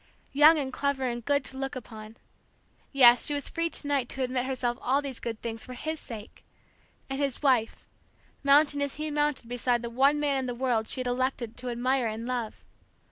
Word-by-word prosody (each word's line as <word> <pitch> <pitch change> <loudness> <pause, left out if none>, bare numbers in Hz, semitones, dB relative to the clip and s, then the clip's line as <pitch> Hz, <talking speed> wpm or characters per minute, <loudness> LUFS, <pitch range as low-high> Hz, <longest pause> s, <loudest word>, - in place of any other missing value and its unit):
Young 300 +3 +7
and 265 -3 -3
clever 280 -1 -1
and 240 -2 -3
good 285 +2 +1
to 265 0 -3
look 270 0 -4
upon, 220 -2 -10 0.7
yes, 245 -3 +7
she 290 - +2
was 285 - -1
free 335 0 -1
to 315 - -1
night 275 -4 0
to 265 - -1
admit 255 0 -2
herself 245 -2 -2
all 265 +3 +2
these 275 -4 -6
good 225 -2 -5
things 225 -1 -3
for 255 - -8
his 315 +5 -4
sake! 220 -2 -10 0.6
and 270 0 -4
his 280 -1 -2
wife, 250 -5 +1 0.6
mounting 285 +1 +4
as 280 -1 -2
he 305 0 -4
mounted 295 -4 -1
beside 245 0 0
the 235 - -5
one 275 +5 +3
man 285 -2 +1
in 265 - -1
the 245 - -4
world 240 -3 0
she 260 - 0
had - - -5
elected 245 -2 -2
to 250 0 -3
admire 250 +1 0
and 220 +1 -5
love. 245 -3 -4
260 Hz, 205 wpm, -28 LUFS, 240-280 Hz, 0.7 s, Young